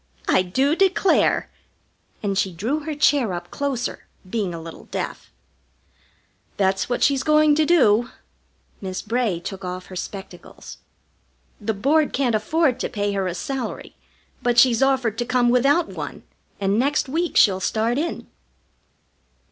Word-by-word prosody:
I - - +4
do 265 - +1
declare!" 385 +1 +2 0.8
And 200 -1 -1
she 190 0 0
drew 225 - -2
her 310 0 -5
chair 280 -8 +2
up 175 0 -6
closer, 275 -4 -3 0.2
being 200 -2 -2
a 170 - -6
little 165 0 -10
deaf. - - -5 1.3
"That's 190 +1 +1
what 245 - 0
she's 275 -2 +3
going 305 0 +4
to 305 0 +2
do." 240 -8 +4 0.7
Miss 185 -1 -5
Bray 230 -7 -1
took 190 +2 -7
off 180 0 -5
her - - -7
spectacles. 190 -1 -9 0.8
"The 215 0 -2
Board 290 +9 +2
can't 260 -4 +1
afford 260 +5 +1
to - - -2
pay 205 -3 -2
her 195 -1 -1
a 175 - -3
salary, 265 +7 -5 0.5
but 245 -1 0
she's 240 -1 +5
offered 260 -5 +1
to - - +1
come 250 0 +2
without 275 +7 +3
one, - - -7 0.4
and 200 +2 +1
next 285 +3 +1
week 330 +5 -1
she'll 190 -3 +5
start 225 +6 0
in." 335 +2 -3
240 Hz, 150 wpm, -22 LUFS, 195-280 Hz, 1.3 s, she's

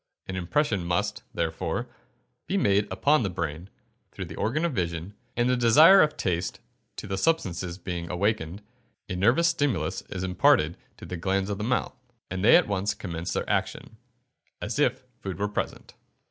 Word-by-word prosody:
An 95 - -5
impression 100 - 0
must, 85 0 -1
therefore, 80 -1 -2 0.6
be 200 - 0
made 100 - +2
upon 150 0 +3
the 100 - 0
brain, 85 0 -4 0.4
through - - -6
the - - -9
organ 150 +10 0
of 170 - -1
vision, 85 -1 -3 0.2
and 120 0 +2
the 125 - +3
desire 155 +10 +7
to 150 - -17
taste 90 -1 -2 0.4
the 95 - -4
substances 95 - 0
being 85 -2 -5
awakened, 100 0 -1 0.4
a 95 - -4
nervous 120 - +4
stimulus 135 - 0
is 95 - -4
imparted 85 -3 +3 0.2
to - - -10
the 90 - -5
glands 95 +3 0
of 100 - -3
the - - -2
mouth, 125 +3 -1 0.4
and 95 +1 -3
they 110 - +8
at 175 - +5
once 100 +1 -1
commence 85 -3 -5
their - - -2
action, 110 - -2 0.6
as - - -3
if - - +2 0.2
food 95 -2 -5
were 105 - 0
present. 105 - -4
95 Hz, 170 wpm, -27 LUFS, 90-120 Hz, 0.6 s, they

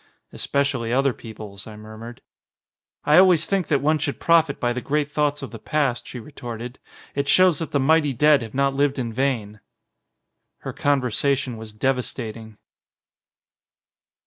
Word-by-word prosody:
"Especially 140 -5 -1
other 135 +1 +2
people's," 110 -4 -10
I 110 - -10
murmured. 110 +2 -11 0.8
"I 150 +4 +6
always 180 -4 +5
think 195 -3 -1
that 145 -4 +1
one 155 +1 +2
should 140 -1 -3
profit 165 -4 +3
by 120 0 0
the 125 - -4
great 150 +2 -1
thoughts 145 -1 0
of 135 - -7
the 115 - -9
past," 135 -1 -1
she 125 - -7
retorted. 120 -1 -8 0.3
"It 140 0 -2
shows 185 -3 +4
that 165 - -4
the 145 - 0
mighty 150 +1 +3
dead 150 +3 +4
have 110 0 -8
not 140 0 +2
lived 140 0 +1
in 120 -3 -3
vain." 115 -5 -2 1.0
Her - - -6
conversation 135 -1 0
was 110 -1 -9
devastating. 110 -2 -3
135 Hz, 150 wpm, -23 LUFS, 115-145 Hz, 1.0 s, I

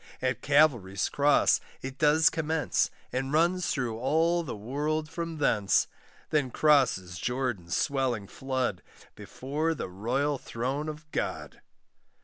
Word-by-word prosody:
At 125 -3 -1
Calvary's 125 -11 +3
cross 145 0 +3 0.2
it 130 0 -6
does 150 +1 +5
commence, 160 -2 0 0.2
And 135 +1 -2
runs 175 +4 +2
through 120 -6 -2
all 165 +6 +2
the 155 -9 -5
world 150 +8 -2
from 165 0 -5
thence; 105 -9 +2 0.5
Then 145 -4 +1
crosses 120 - +2
Jordan's 120 -8 -2
swelling 130 -7 0
flood, 130 -7 -2 0.3
Before 155 +5 -3
the 135 - -5
royal 130 +9 -1
throne 135 +6 -3
of 150 0 -9
God. - - -4
135 Hz, 125 wpm, -28 LUFS, 120-155 Hz, 0.5 s, does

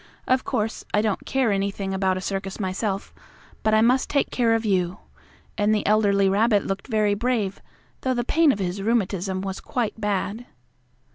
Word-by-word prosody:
Of 255 0 +2
course, 225 -4 -2
I 210 - +3
don't 215 -3 -2
care 260 -5 +1
anything 195 0 -1
about 190 -1 +1
a - - -4
circus 195 +1 -4
myself, 195 +1 -2 0.5
but 215 0 +2
I 215 - +5
must 250 +3 +3
take 280 - +1
care 230 -2 +2
of 225 0 -1
you," 185 -3 +1 0.6
and 210 +1 +3
the 210 - -1
elderly 200 -2 +3
rabbit 205 +1 +3
looked 195 0 -3
very 215 -4 +2
brave, 215 -3 -1 0.4
though 260 -1 0
the 240 - 0
pain 315 +4 +4
of 210 - -2
his 190 0 -3
rheumatism 195 -4 0
was 195 0 -4
quite 230 -2 -3
bad. 210 +3 -2
205 Hz, 180 wpm, -24 LUFS, 195-230 Hz, 0.6 s, I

